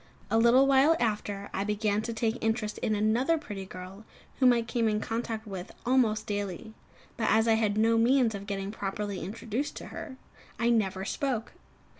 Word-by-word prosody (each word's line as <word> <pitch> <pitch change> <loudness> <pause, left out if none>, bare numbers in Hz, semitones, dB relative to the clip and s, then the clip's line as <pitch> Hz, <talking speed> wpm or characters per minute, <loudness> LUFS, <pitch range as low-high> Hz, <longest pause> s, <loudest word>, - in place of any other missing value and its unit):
A 225 - +4
little 240 +4 +6
while 275 +4 +5
after, 205 -3 -2
I 195 - -1
began 210 0 0
to 230 - -4
take 225 0 -1
an - - -18
interest 220 -1 -1
in 215 - 0
another 230 +10 +2
pretty 205 -11 -7
girl 185 +3 -9 0.4
whom 255 -2 +6
I 235 -1 +2
came 230 0 0
in 210 0 0
contact 225 0 -3
with 190 -4 -7
almost 235 -4 +2
daily; 205 +1 -4 0.4
but, 225 - 0
as 220 +1 +4
I 225 - +5
had 215 -2 +1
no 225 +1 +4
means 240 -1 +3
of 200 0 -7
getting 195 -1 -3
properly 200 -1 -4
introduced 230 +6 -4
to - - -7
her, 260 - -7 0.4
I 235 +1 +2
never 195 -4 0
spoke. 245 -1 -2
220 Hz, 185 wpm, -29 LUFS, 205-235 Hz, 0.4 s, little